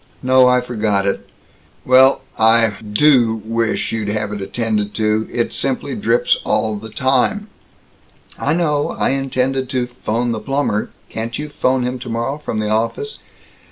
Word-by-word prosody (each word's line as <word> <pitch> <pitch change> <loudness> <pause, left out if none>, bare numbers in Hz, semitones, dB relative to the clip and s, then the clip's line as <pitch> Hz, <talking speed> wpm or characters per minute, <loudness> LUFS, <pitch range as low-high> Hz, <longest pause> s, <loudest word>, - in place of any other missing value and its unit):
"No, 130 0 +5
I 125 0 +4
forgot 105 -5 -1
it." 100 - -2 0.6
"Well, 130 +1 +5
I 115 0 +4
do 115 +1 +3
wish 115 0 -1
you'd 110 -2 -2
have 105 0 -2
it 105 - -5
attended 105 0 -2
to. 110 0 0
It - - -1
simply - - -2
drips - - +2
all 110 -1 0
the 110 +2 -8
time." 135 - 0 0.9
"I 145 - +1
know. 150 -4 +1
I - - +1
intended 135 -1 -1
to 130 -2 0
'phone 120 -1 -2
the 110 - -2
plumber 135 -3 -1 0.2
Can't 115 +1 -4
you 150 0 -5
'phone 130 -3 0
him 125 +1 -3
tomorrow, 120 +3 -3
from 150 - -4
the 105 -1 -1
office?" 115 - -2
120 Hz, 155 wpm, -18 LUFS, 110-130 Hz, 0.9 s, No